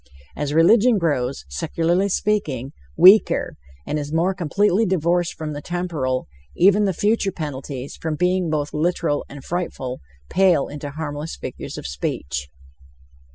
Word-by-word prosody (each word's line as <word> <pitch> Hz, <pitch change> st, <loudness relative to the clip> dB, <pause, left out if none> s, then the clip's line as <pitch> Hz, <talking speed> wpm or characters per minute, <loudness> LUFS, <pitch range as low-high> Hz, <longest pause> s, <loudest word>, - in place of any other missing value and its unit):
As 145 Hz, -1 st, -2 dB
religion 215 Hz, +9 st, +5 dB
grows, 140 Hz, -, -1 dB
secularly 165 Hz, -, 0 dB
speaking, 185 Hz, -, -1 dB, 0.3 s
weaker, 200 Hz, +4 st, +6 dB, 0.3 s
and 150 Hz, -, -2 dB
is 145 Hz, 0 st, -5 dB
more 170 Hz, +4 st, +1 dB
completely 195 Hz, +4 st, +1 dB
divorced 175 Hz, -2 st, +1 dB
from 155 Hz, -1 st, -5 dB
the 145 Hz, -, -6 dB
temporal, 160 Hz, -, -2 dB, 0.3 s
even 200 Hz, +3 st, +5 dB
the 195 Hz, -, +2 dB
future 205 Hz, +2 st, +1 dB
penalties, 140 Hz, -4 st, -6 dB
from 160 Hz, -1 st, -3 dB
being 180 Hz, +1 st, +1 dB
both 150 Hz, -1 st, -2 dB
literal 160 Hz, -1 st, 0 dB
and 140 Hz, -1 st, -10 dB
frightful, 150 Hz, -7 st, -3 dB, 0.3 s
pale 180 Hz, -6 st, +3 dB
into 145 Hz, 0 st, -6 dB
harmless 150 Hz, +1 st, -5 dB
figures -, -, -7 dB
of -, -, -7 dB
speech. 70 Hz, +1 st, -4 dB
160 Hz, 135 wpm, -22 LUFS, 145-185 Hz, 0.3 s, weaker